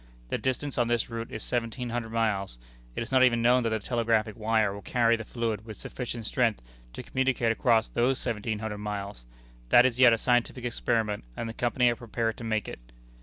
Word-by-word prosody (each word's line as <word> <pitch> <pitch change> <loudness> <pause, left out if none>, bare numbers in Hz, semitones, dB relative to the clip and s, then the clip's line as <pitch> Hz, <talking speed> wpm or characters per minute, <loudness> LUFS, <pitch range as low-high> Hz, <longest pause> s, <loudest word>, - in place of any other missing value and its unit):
The - - -1
distance 130 +1 -2
on 120 - +2
this 120 0 0
route 115 0 -4
is 110 - -6
seventeen 120 0 -3
hundred 120 -1 -3
miles. 105 - -1 0.4
It - - -2
is 115 - -9
not 130 -1 +5
even 120 -2 +3
known 125 +1 +5
that 115 - 0
the 110 - 0
telegraphic 115 -1 0
wire 110 -2 +1
will 100 - -8
carry 115 +2 +2
the 115 - -5
fluid 110 -2 -3
with 110 -2 -9
sufficient 120 -3 -6
strength 115 -2 +1 0.3
to - - -7
communicate 130 -3 +1
across 115 -2 +2
those 125 +2 +1
seventeen 110 -3 -3
hundred 105 -1 -5
miles. 100 -11 -5 0.4
That 120 - +7
is 125 -1 0
yet 125 -2 +8
a 115 - +3
scientific 120 +1 0
experiment, 110 -3 -1
and 115 - -3
the 115 - -5
Company 120 +1 +1
are - - -2
prepared 115 -1 -2
to - - -8
make 110 -2 -1
it. - - -7
115 Hz, 210 wpm, -28 LUFS, 110-120 Hz, 0.4 s, yet